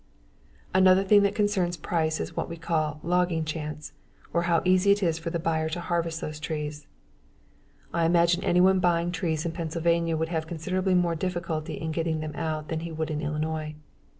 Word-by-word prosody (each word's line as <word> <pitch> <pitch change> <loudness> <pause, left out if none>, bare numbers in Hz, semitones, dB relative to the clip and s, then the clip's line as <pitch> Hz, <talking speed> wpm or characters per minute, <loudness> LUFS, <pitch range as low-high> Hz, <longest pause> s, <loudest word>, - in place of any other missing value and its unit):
Another 185 0 +5
thing 205 +1 +6
that 200 0 +1
concerns 195 -5 +1
price 160 0 -1
is - - -5
what - - -2
we 170 - -6
call 155 -2 -1
"logging 175 -1 +1
chance" 150 -1 -5 0.4
or 170 - +2
how 170 -1 +3
easy 185 +2 +5
is 200 0 -2
it 165 -2 +1
for 170 - -3
the 170 - -1
buyer 160 -1 0
to 165 +2 -3
harvest 170 -1 -2
those 155 0 -5
trees. 150 -1 -5 1.1
I 170 -1 +2
imagine 170 +1 +3
anyone 185 +2 +4
buying 175 -1 +2
trees 165 -3 -2
in 170 - -1
Pennsylvania 165 0 0
would 160 +1 -1
have 160 -2 -2
considerably 185 +3 -1
more 175 -1 +2
difficulty 170 -2 -3
in 160 0 -4
getting 160 0 -1
them 155 -1 -5
out 155 -2 -3
than 160 - -1
he 165 +1 -6
would 160 0 -3
in 150 0 -2
Illinois. 155 +1 -3
165 Hz, 185 wpm, -27 LUFS, 155-175 Hz, 1.1 s, thing